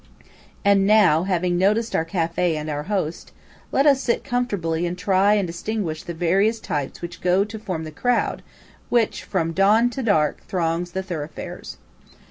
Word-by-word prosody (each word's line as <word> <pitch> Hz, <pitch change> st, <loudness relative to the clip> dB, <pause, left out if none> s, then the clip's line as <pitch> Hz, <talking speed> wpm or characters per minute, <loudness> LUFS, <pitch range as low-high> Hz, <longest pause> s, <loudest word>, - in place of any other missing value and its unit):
And 200 Hz, -1 st, +4 dB
now, 190 Hz, -6 st, +5 dB
having 180 Hz, -2 st, 0 dB
noticed 215 Hz, +5 st, +1 dB
our 160 Hz, -, +1 dB
café 170 Hz, -1 st, 0 dB
and 155 Hz, 0 st, -4 dB
our 145 Hz, 0 st, -2 dB
host, 185 Hz, -6 st, -2 dB, 0.4 s
let 275 Hz, -, +2 dB
us 275 Hz, -2 st, +5 dB
sit 235 Hz, -, 0 dB
comfortably 200 Hz, -, -1 dB
and 175 Hz, +1 st, -4 dB
try 195 Hz, +2 st, +3 dB
and 200 Hz, -2 st, +1 dB
distinguish 170 Hz, -1 st, -3 dB
the 170 Hz, -, -7 dB
various 195 Hz, +7 st, +2 dB
types 145 Hz, -4 st, -4 dB
which 170 Hz, 0 st, -7 dB
go 180 Hz, +2 st, +3 dB
to 215 Hz, +1 st, -7 dB
form 185 Hz, -7 st, -4 dB
the 155 Hz, -, -7 dB
crowd 245 Hz, +9 st, 0 dB, 0.5 s
which 235 Hz, -3 st, +1 dB
from 165 Hz, -4 st, -1 dB
dawn 215 Hz, +6 st, +4 dB
to 265 Hz, -, -4 dB
dark 155 Hz, -, +1 dB
throngs 175 Hz, -1 st, -1 dB
the 190 Hz, -, -2 dB
thoroughfares. 160 Hz, -5 st, -7 dB
185 Hz, 165 wpm, -22 LUFS, 165-215 Hz, 0.5 s, now